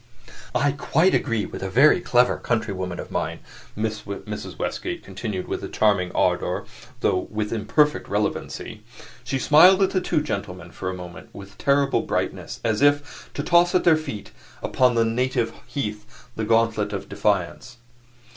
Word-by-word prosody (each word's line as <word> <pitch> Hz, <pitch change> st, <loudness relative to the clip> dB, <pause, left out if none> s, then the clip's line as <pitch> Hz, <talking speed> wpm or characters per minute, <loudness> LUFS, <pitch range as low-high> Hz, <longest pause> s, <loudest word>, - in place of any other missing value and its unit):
"I 145 Hz, 0 st, +3 dB
quite 160 Hz, +6 st, +2 dB
agree 115 Hz, -5 st, 0 dB
with -, -, -8 dB
a 95 Hz, -, -3 dB
very 140 Hz, -, +5 dB
clever 125 Hz, -4 st, +3 dB
countrywoman 100 Hz, -6 st, -2 dB
of -, -, -7 dB
mine," -, -, -2 dB, 0.4 s
Mrs. 105 Hz, -2 st, -5 dB
Westgate -, -, -4 dB
continued 95 Hz, -1 st, -5 dB
with -, -, -4 dB
charming 100 Hz, -4 st, +2 dB
ardor, -, -, 0 dB, 0.4 s
though 90 Hz, -, +1 dB
with 105 Hz, 0 st, -3 dB
imperfect 115 Hz, +8 st, +1 dB
relevancy. 105 Hz, +1 st, -3 dB, 0.4 s
She 125 Hz, +3 st, -2 dB
smiled 180 Hz, +8 st, +6 dB
at 190 Hz, -, +2 dB
the 185 Hz, -, +1 dB
two 160 Hz, -4 st, 0 dB
gentlemen 100 Hz, -9 st, -5 dB
for 95 Hz, -, -5 dB
a 95 Hz, -, -4 dB
moment 90 Hz, -2 st, -10 dB
with 100 Hz, 0 st, -11 dB
terrible 140 Hz, 0 st, +2 dB
brightness, -, -, -3 dB
as 110 Hz, +1 st, +1 dB
if 145 Hz, 0 st, +1 dB
to 145 Hz, -, -2 dB
toss 175 Hz, +2 st, +4 dB
at 185 Hz, -, +3 dB
their 170 Hz, -2 st, +6 dB
feet 140 Hz, -11 st, -6 dB, 0.3 s
upon 125 Hz, -2 st, +2 dB
their 115 Hz, 0 st, +3 dB
native 120 Hz, +1 st, 0 dB
heath 105 Hz, -3 st, -6 dB
the 110 Hz, -, -2 dB
gauntlet 115 Hz, -2 st, +1 dB
of 100 Hz, -, -5 dB
defiance. 105 Hz, +4 st, -1 dB
115 Hz, 155 wpm, -23 LUFS, 100-140 Hz, 0.4 s, smiled